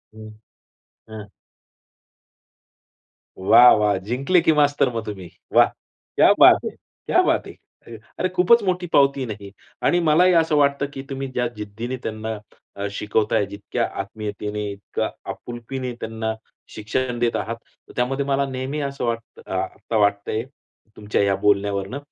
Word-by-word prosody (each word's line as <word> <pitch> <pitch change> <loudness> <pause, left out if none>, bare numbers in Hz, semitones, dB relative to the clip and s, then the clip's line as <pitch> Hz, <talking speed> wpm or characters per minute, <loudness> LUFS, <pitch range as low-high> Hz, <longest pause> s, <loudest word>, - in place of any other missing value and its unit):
हं, 110 0 -10 0.8
ह. 110 -1 -8 2.1
वाह, 120 +6 +7
वाह! 105 -2 +2
जिंकले 130 - +1
की 160 - +3
मास्तर 145 -2 +3
मग 115 -1 -3
तुम्ही? 95 -5 -7 0.2
वाह! - - +7 0.5
क्या - - +6
बात - - +9
हे, - - -1 0.4
क्या - - +4
बात - - +1
हे! - - -9 0.3
अ, 115 - -9 0.2
अरे, 185 - +1
खूपच 185 +6 +4
मोठी 180 -2 -1
पावती 140 0 +4
आहे 130 - -3
ना 110 - -3
ही 100 - -10 0.3
आणि 175 - +3
मलाही 175 +3 +4
असं 165 -2 +3
वाटतं, 140 -1 +2
की 135 - -6
तुम्ही 135 0 -4
ज्या 125 -1 0
जिद्दीने 110 +5 -5
त्यांना 110 0 -4 0.4
अ, 100 0 -3
शिकवताय, 105 0 0
जितक्या 100 +1 -3 0.2
आत्मीयतेने, 105 0 -5
इतक्या 100 0 -4 0.2
आपुलकीने 125 +2 -6
त्यांना 110 0 -3 0.4
शिक्षण 120 +3 -2
देत 120 -1 +1
आहात 115 +1 -2 0.4
त्यामध्ये 135 +3 0
मला 140 0 +1
नेहमी 130 +3 -4
असं 140 -2 -3
वाटतं 115 -1 -4
अ, - - -7
आता 115 - -3
वाटतंय 100 +1 +1 0.5
तुमच्या 100 -1 0
बोलण्यावरन, 100 +2 +1
115 Hz, 145 wpm, -22 LUFS, 105-140 Hz, 2.1 s, बात